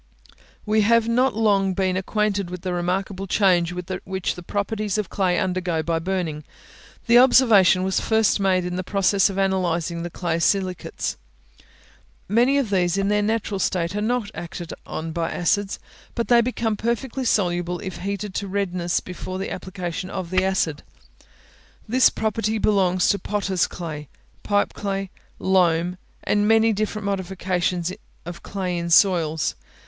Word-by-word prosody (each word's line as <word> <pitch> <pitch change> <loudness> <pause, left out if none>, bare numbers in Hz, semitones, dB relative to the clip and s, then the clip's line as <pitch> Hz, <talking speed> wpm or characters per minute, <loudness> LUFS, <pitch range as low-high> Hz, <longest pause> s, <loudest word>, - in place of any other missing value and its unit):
We 215 0 +2
have 230 +2 +3
not 250 +2 +2
long 200 -4 +2
been 185 -1 0
acquainted 200 0 -1
with 180 -1 -7
the 185 -1 -2
remarkable 185 +2 -2
change 180 -3 +3
which 185 +1 -4
the 180 - -10
properties 205 +2 -2
of 210 -4 -3
clay 185 -3 +1
undergo 180 -3 -1
by 165 +1 0
burning. 165 -4 -3 0.6
The 235 0 +6
observation 220 -8 +6
was 190 0 +1
first 220 -2 +2
made 185 -2 +2
in 180 0 -3
the 185 - -2
process 195 +1 +2
of 195 - -5
analysing 175 -3 0
the 175 - -4
clay 170 -1 -2
silicates. 185 0 -1 1.1
Many 240 +7 +3
of 255 -7 0
these, 180 -1 +1
in 195 0 +1
their 210 0 +2
natural 210 -2 -1
state, 180 -1 -1
are 210 - -1
not 225 -1 -1
acted 170 0 -7
on 160 +1 -5
by 165 0 -2
acids, 200 +3 0 0.4
but 235 - -2
they 240 -1 +6
become 230 -2 -1
perfectly 235 +4 -2
soluble 175 -6 0
if 190 0 -6
heated 200 +1 -4
to 200 - -3
redness 180 -3 -1
before 185 0 -6
the 195 - -4
application 185 -1 -5
of 185 -3 -5
the 185 0 +2
acid. 185 -6 0 1.1
This 255 +3 +5
property 220 0 -1
belongs 190 -4 +2
to 200 - +2
potters' 195 -3 0
clay, 150 -4 -7 0.3
pipe 205 -1 0
clay, 195 -1 -3 0.3
loam, 180 -1 +2 0.2
and 205 0 +1
many 225 0 +4
different 215 0 -3
modifications 185 -2 -1 0.3
of 175 0 -8
clay 185 -3 -3
in 170 0 -3
soils. 165 -4 +3
190 Hz, 155 wpm, -23 LUFS, 175-210 Hz, 1.1 s, The